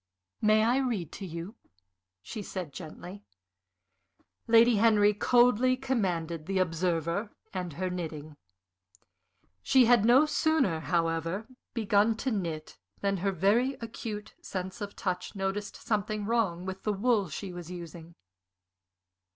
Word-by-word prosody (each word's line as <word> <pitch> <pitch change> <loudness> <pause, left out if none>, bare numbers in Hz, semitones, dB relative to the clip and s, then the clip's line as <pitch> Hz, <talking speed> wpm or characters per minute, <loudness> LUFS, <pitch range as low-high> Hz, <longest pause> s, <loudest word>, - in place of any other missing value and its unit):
"May 215 0 +4
I 240 +3 +3
read 235 - -1
to 195 - -7
you?" 170 +6 -7 0.7
she 220 - -6
said, 185 -7 -6
gently. 180 +4 -9 1.2
Lady 230 0 +6
Henry 210 -1 +5
coldly 250 +3 +4
commanded 175 - -2
the 195 0 -1
Observer 170 +2 0 0.2
and 180 -4 -4
her 185 +5 -2
knitting. 155 -4 -6 1.3
She 255 - +5
had 240 -2 +5
no 250 +6 +6
sooner, 305 - +1
however, 165 +4 -1 0.3
begun 215 0 +2
to 260 +3 -2
knit 165 -7 -4 0.2
than 195 -1 +1
her 195 +2 0
very 210 +9 +2
acute 220 -2 -6
sense 190 +3 -5
of 205 -1 -5
touch 185 -3 -3
noticed 195 +1 -3
something 215 -1 -2
wrong 200 -6 0
with 190 0 -5
the 210 - 0
wool 205 -2 +1
she 185 +5 -6
was 175 -1 -8
using. 170 -1 -9
200 Hz, 125 wpm, -29 LUFS, 175-225 Hz, 1.3 s, Lady